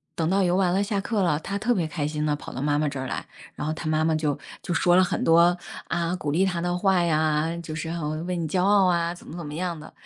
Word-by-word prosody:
等 160 -1 0
到 195 +1 +3
游 180 -1 +2
完 185 -2 +2
了 195 +2 +2
下 200 -1 -1
课 205 -1 0
了， 150 -4 +2
他 195 +5 -4
特 240 +4 +1
别 170 -6 0
开 150 -1 -3
心 150 0 -3
地 150 -1 +1
跑 - - -9
到 130 - -4
妈 145 0 +1
妈 150 0 +1
这 140 -2 -4
儿 130 - -3
来， - - -4 0.3
然 - - -4
后 155 - 0
他 155 - -6
妈 155 0 +2
妈 160 0 +2
就 155 -2 0 0.2
就 - - -5
说 175 +1 +3
了 185 - +6
很 185 - -1
多， 170 +2 +5 0.3
啊， 170 +1 -1
鼓 150 -5 -4
励 175 +7 +2
他 175 -3 -1
的 175 0 -1
话 190 -1 +3
呀， 155 -2 +2 0.2
就 155 -1 -6
是 160 +1 -4
很 155 -1 -3
为 180 -1 -1
你 165 -2 -2
骄 180 +3 0
傲 200 0 +5
啊， 170 -1 +2
怎 - - -15
么 165 - -9
怎 170 - -6
么 150 - -7
样 170 -1 -3
的， 150 - -11
170 Hz, 315 characters per minute, -25 LUFS, 155-180 Hz, 0.3 s, 了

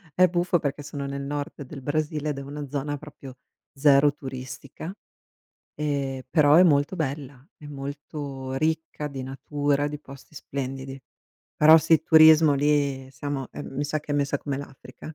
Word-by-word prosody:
è 185 0 +6
buffo 175 0 +1
perché 145 -1 -3
sono 145 -1 -6
nel 140 0 -4
Nord 145 +1 -5
del 135 +1 -10
Brasile 150 +1 -2
ed 145 - -3
è - - -5
una 145 +1 -6
zona 145 +1 -3
proprio 140 -3 -12 0.4
0 140 0 +5
turistica, 130 +5 -8 0.8
e 140 -3 -2
però 150 -3 +5
è 175 - +8
molto 150 0 +3
bella, 140 -3 -5
è 150 - -12
molto 140 -1 -6
ricca 155 +1 -2
di 135 -2 -6
natura, 145 +2 -1
di 150 0 -6
posti 135 +1 -14
splendidi. 135 -1 -6 0.6
Però 155 +1 +8
sì, 160 0 +3
turismo 160 -2 +7
lì 140 -2 +1
siamo, 135 0 -5
ehm, - - -7
mi 145 - -1
sa 150 +1 -2
che 150 0 -6
è - - 0
messa 145 0 0
come 140 -1 -4
l'Africa. 135 +2 -10
145 Hz, 160 wpm, -25 LUFS, 135-150 Hz, 0.8 s, è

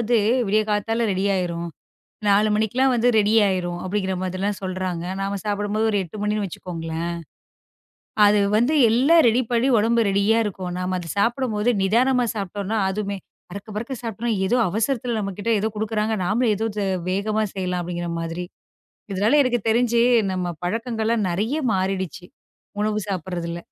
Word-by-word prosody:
வந்து 235 0 +2 0.3
விடியக் 215 +2 +1
காத்தால 225 +2 0
ரெடி 190 0 -1
ஆயிரும். 170 -2 -2 0.6
4:00 205 +1 +4
மணிக்கெல்லாம் 245 +5 +2
வந்து 240 +1 +2
ரெடி 210 +1 +3
ஆயிரும் 175 -2 -1
அப்படிங்கற 190 0 -1
மாதிரிலாம் 185 +2 -2
சொல்றாங்க. 185 -2 -3 0.2
நாம 195 +1 -2
சாப்பிடும்போது 205 +1 -1
ஒரு 205 - +1
8:00 175 +4 -11
மணின்னு 210 0 0
வச்சுக்கோங்களேன். 165 -2 -5 1.2
அது 205 0 +4 0.2
வந்து 245 +8 +2 0.2
எல்லாம் 285 +8 +5
ரெடி 240 +3 +2
பண்ணி, 240 +2 +2
உடம்பு 230 +2 +2
ரெடியா 200 +3 +2
இருக்கும். 185 -3 -4
நாம 185 0 -2
அது 170 -2 -7
சாப்பிடும்போது 235 0 +1
நிதானமா 245 +6 +3
சாப்பிட்டோம்னா 205 +1 -3
அதுவுமே 200 0 -3 0.3
பறக்க 200 +3 -8
பறக்கச் 235 +4 -5
சாப்டம்னா, 230 +1 -3
ஏதோ 220 +6 +2
அவசரத்துல 230 +4 -1
நம்மகிட்ட 200 +2 -3
ஏதோ 215 +2 0
குடுக்குறாங்க. 215 +1 -1
நாம 220 +7 +1
ஏதோ 215 +2 -3 0.5
வேகமா 210 +3 0
செய்யலாம் 180 -2 -2
அப்படிங்கிற 175 0 -4
மாதிரி. 165 +2 -4 0.7
இதனால 210 +9 +3
எனக்குத் 240 -5 -1
தெரிஞ்சு 235 +1 +3 0.3
நம்ம 180 -1 -2
பழக்கங்கள 225 +4 -2
எல்லாம் 225 -3 +1
நிறைய 215 - -1 0.2
மாறிடுச்சு, 190 -2 -2 0.6
உணவு 215 0 0
சாப்பிடுறதுல. 175 -2 -4
205 Hz, 145 wpm, -23 LUFS, 185-225 Hz, 1.2 s, எல்லாம்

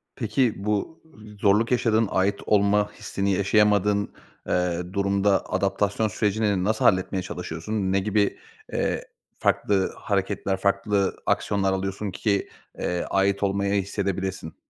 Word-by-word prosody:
Peki, 125 -5 +1
bu 105 +10 -2 0.4
z - - -21
zorluk 105 +4 +3
yaşadığın, 115 -3 +2
ait 100 +2 +2
olma 105 0 +3
hissini 100 0 -2
yaşayamadığın, 100 0 +2 0.4
eee, 90 -1 0
durumda 100 0 +2
adaptasyon 100 +3 +1
sürecini 105 -2 0
nasıl 110 +2 0
halletmeye 95 0 +2
çalışıyorsun? 95 +2 -6 0.2
Ne 95 - +3
gibi, 105 +1 +1 0.4
eee, - - -1 0.4
farklı 95 -2 +1
hareketler, 100 -1 -1
farklı 100 0 +1
aksiyonlar 95 -2 +1
alıyorsun 95 +1 -3
ki, 100 +2 -1 0.3
eee, 90 0 -1
ait 100 +1 +1
olmayı 100 0 +1
hissedebilesin? 95 -3 -3
100 Hz, 120 wpm, -25 LUFS, 95-105 Hz, 0.4 s, zorluk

